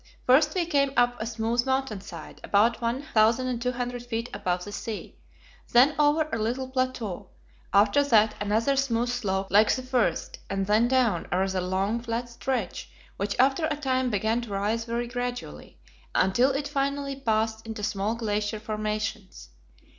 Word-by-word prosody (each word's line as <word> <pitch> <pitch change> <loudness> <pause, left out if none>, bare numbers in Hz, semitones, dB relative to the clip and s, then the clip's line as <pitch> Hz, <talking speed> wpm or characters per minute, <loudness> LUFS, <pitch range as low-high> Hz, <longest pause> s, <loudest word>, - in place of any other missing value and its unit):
First 300 +6 +4
we 355 -2 +1
came 280 -4 +1
up 245 -1 +2
a 220 - -2
smooth 230 +1 0
mountain 265 -6 -1
side, 170 -5 -10
about 225 +4 +2
1,200 245 0 0
feet 235 0 -4
above 180 0 -1
the 205 - -7
sea, 215 +1 -6 0.6
then 255 +5 +6
over 300 +1 +3
a 230 - -1
little 245 +4 -1
plateau; 245 -7 -2 0.4
after 205 +7 +4
that 220 -5 +4
another 220 +6 +1
smooth 245 -3 0
slope 195 -6 -2
like 210 +2 +5
the 255 - -5
first, 255 -3 -1
and 195 0 -1
then 215 +4 +3
down 240 -9 +1
a 180 - +1
rather 190 0 0
long, 190 +5 0
flat 235 +1 -3
stretch, 240 -4 -3 0.3
which 200 +1 -2
after 270 +5 +3
a 295 - -2
time 260 -3 0
began 220 +2 0
to 235 - -8
rise 210 +3 -1
very 235 +1 -2
gradually, 245 - -5 0.4
until 190 +8 +3
it 280 +1 -2
finally 280 -1 -1
passed 220 -3 -1
into 220 -2 -6
small 205 +2 -1
glacier 210 -2 -2
formations. 215 - -4
230 Hz, 155 wpm, -26 LUFS, 210-255 Hz, 0.6 s, then